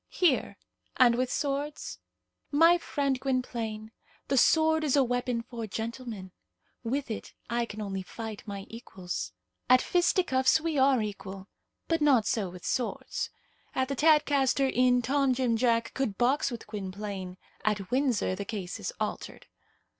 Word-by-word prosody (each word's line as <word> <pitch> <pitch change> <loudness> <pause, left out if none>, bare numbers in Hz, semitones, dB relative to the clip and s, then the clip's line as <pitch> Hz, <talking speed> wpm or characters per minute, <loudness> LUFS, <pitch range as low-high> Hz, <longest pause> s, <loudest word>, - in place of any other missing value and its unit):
"Here, 335 -8 +1 0.4
and 245 -2 +6
with 250 +1 0
swords?" 285 +1 -3 0.5
"My 330 +4 +5
friend 280 -5 -1
Gwynplaine, 235 -5 -2 0.4
the 275 - +2
sword 315 +4 +4
is 295 -3 +2
a 280 - +5
weapon 245 -1 -1
for 230 -2 -6
gentlemen. 225 -2 -5 0.5
With 260 +2 -2
it 215 - -6 0.2
I 235 0 +1
can 215 0 -7
only 195 -2 -3
fight 220 +3 -7
my 200 -1 -6
equals. 190 -6 -6 0.4
At 255 0 +8
fisticuffs 330 -5 +3
we 320 -1 -2
are 265 -3 +4
equal, 195 -2 -7 0.4
but 330 -1 +1
not 265 -7 +4
so 205 -5 0
with 180 0 -11
swords. 250 -3 -2 0.5
At 260 0 0
the 275 - -1
Tadcaster 285 -3 +3
Inn 250 0 +3
Tom 270 +1 +2
Jim 245 -3 +1
Jack 230 -1 +1
could 225 -8 -2
box 265 +4 +2
with 240 -3 -7
Gwynplaine; 195 -2 -6 0.3
at 205 -3 -1
Windsor 255 -7 +1
the 195 +2 -4
case 195 -4 -5
is - - -3
altered. - - -4
245 Hz, 145 wpm, -29 LUFS, 215-275 Hz, 0.5 s, At